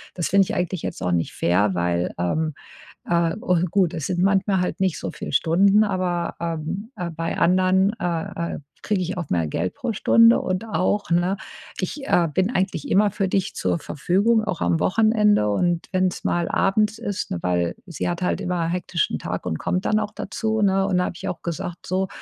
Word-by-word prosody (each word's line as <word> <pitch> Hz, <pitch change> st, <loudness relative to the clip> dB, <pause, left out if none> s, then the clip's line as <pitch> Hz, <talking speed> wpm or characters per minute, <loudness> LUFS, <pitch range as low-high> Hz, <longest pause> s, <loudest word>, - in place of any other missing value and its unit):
das 175 Hz, -, -2 dB
finde 195 Hz, +1 st, +5 dB
ich -, -, -4 dB
eigentlich 180 Hz, -1 st, -2 dB
jetzt -, -, -5 dB
auch 90 Hz, -, 0 dB
nicht 85 Hz, -1 st, 0 dB
fair, 95 Hz, +3 st, +1 dB
weil, 85 Hz, 0 st, 0 dB
ähm, 155 Hz, -, -1 dB, 0.5 s
äh“ 170 Hz, 0 st, +1 dB
Und 180 Hz, -4 st, 0 dB
gut, 185 Hz, -2 st, +2 dB
es 160 Hz, -4 st, -3 dB
sind 180 Hz, -1 st, -1 dB
manchmal 195 Hz, -1 st, +2 dB
halt 180 Hz, -, -2 dB
nicht 185 Hz, -5 st, +1 dB
so -, -, -4 dB
viel 150 Hz, -, -7 dB
Stunden, 195 Hz, +6 st, +4 dB
aber, 180 Hz, -4 st, -1 dB
ähm, 170 Hz, +5 st, -4 dB
äh, 175 Hz, -1 st, -4 dB
bei 165 Hz, +1 st, -3 dB
anderen, 185 Hz, +3 st, +3 dB
äh, 170 Hz, 0 st, -3 dB
äh, -, -, -7 dB, 0.2 s
kriege 205 Hz, -4 st, 0 dB
ich 180 Hz, +1 st, -3 dB
auch 170 Hz, -5 st, -4 dB
mehr 85 Hz, -3 st, +1 dB
Geld 85 Hz, +4 st, -2 dB
pro 240 Hz, -3 st, -3 dB
Stunde 230 Hz, +3 st, +5 dB
und 185 Hz, +3 st, -2 dB
auch, 205 Hz, -1 st, 0 dB
ne 175 Hz, +3 st, +2 dB, 0.4 s
ich, 270 Hz, -, -4 dB
äh, 170 Hz, -1 st, +3 dB
bin 190 Hz, +5 st, +1 dB
eigentlich 185 Hz, -5 st, -1 dB
immer 205 Hz, +2 st, +4 dB
für 195 Hz, -1 st, -1 dB
dich 190 Hz, 0 st, -1 dB
zur -, -, 0 dB
Verfügung, 200 Hz, +10 st, +1 dB
auch 180 Hz, -5 st, -3 dB
am 85 Hz, -1 st, +2 dB
Wochenende. 210 Hz, -, +3 dB
Und 170 Hz, -, 0 dB
wenn's 185 Hz, -1 st, 0 dB
mal 175 Hz, -1 st, 0 dB
abends 210 Hz, +2 st, +1 dB
ist, 205 Hz, -4 st, -3 dB
ne, 90 Hz, -, -1 dB
weil 90 Hz, -1 st, 0 dB
sie 170 Hz, -, -3 dB
hat 175 Hz, +1 st, -3 dB
halt -, -, 0 dB
immer 175 Hz, -2 st, -1 dB
hektischen 175 Hz, -1 st, -1 dB
Tag -, -, -4 dB
und 80 Hz, -, -1 dB
kommt 180 Hz, +1 st, -1 dB
dann 215 Hz, -, +2 dB
auch 210 Hz, -1 st, -3 dB
dazu, 220 Hz, -1 st, -2 dB
ne? 195 Hz, -1 st, +3 dB
Und 190 Hz, -2 st, +1 dB
dann 180 Hz, -, +2 dB
habe -, -, -5 dB
ich -, -, -11 dB
ihr -, -, -1 dB
auch 175 Hz, -, -10 dB
gesagt: 170 Hz, +1 st, -5 dB
„So, 190 Hz, +1 st, 0 dB
180 Hz, 210 wpm, -23 LUFS, 165-195 Hz, 0.5 s, finde